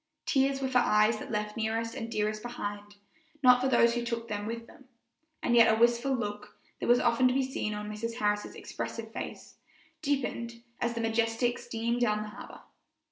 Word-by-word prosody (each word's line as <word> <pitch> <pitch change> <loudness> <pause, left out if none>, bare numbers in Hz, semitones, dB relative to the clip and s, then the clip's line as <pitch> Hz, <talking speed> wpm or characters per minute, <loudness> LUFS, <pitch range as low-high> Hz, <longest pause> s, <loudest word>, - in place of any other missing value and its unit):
Tears 270 -1 +2
were - - +1
for 255 -1 +3
eyes 215 -1 +3
that - - -8
left 210 -1 -2
nearest 225 +1 -1
and 225 - -5
dearest 215 0 -1
behind, 205 -3 -6 0.5
not 250 -1 +7
for 260 - +2
those 235 -3 +4
who 240 0 -1
took 235 -1 -3
them 205 0 -3
with 230 0 -5
them; 265 - -17 0.6
and 240 - +2
yet 230 -1 +7
a 220 - +1
wistful 240 +3 +3
look, 210 -2 -5 0.2
that - - -3
was 245 +1 +6
often 240 +1 +3
to 250 - +1
be 270 - +3
seen 235 -5 -3
on 210 0 -5
Mrs. 225 +2 -4
Harris's 210 -2 -1
expressive - - -6
face, - - -7 0.4
deepened 235 -5 -2 0.2
as 235 0 -1
the 230 - -2
Majestic 225 +2 +1
steamed 235 +1 -2
down 210 -3 +2
the 210 - -7
harbor. - - -11
230 Hz, 190 wpm, -30 LUFS, 215-245 Hz, 0.6 s, not